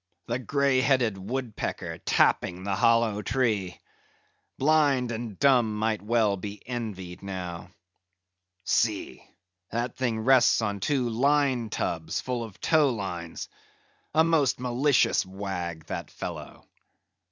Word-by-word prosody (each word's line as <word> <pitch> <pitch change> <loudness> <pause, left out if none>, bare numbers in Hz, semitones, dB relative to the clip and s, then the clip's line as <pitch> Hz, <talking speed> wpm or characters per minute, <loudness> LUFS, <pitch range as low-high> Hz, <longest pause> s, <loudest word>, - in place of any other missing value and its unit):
The 120 +1 -2
greyheaded 130 -3 +2
woodpecker 100 -5 -4
tapping 90 +1 +1
the 100 0 -1
hollow 110 +1 +3
tree! 105 -5 -1 0.8
Blind 140 -4 +3
and 110 -3 -5
dumb 120 -6 +3
might 110 0 0
well 105 -2 +2
be 100 +2 -7
envied 100 -7 -5
now. 90 -3 -6 0.9
See! 105 0 0 0.5
that 120 +2 -3
thing 115 -4 -1
rests 130 +2 +5
on 105 -3 -2
two 130 +4 0
line 130 0 +2
tubs, 80 -5 -2
full 125 -2 -3
of 110 -4 -10
tow 155 -3 +3
lines. 90 -8 -5 0.7
A 160 - +6
most 155 -9 +2
malicious 125 +3 +2
wag, 90 -4 -5
that - - -5
fellow. - - -8
115 Hz, 115 wpm, -27 LUFS, 100-130 Hz, 0.9 s, A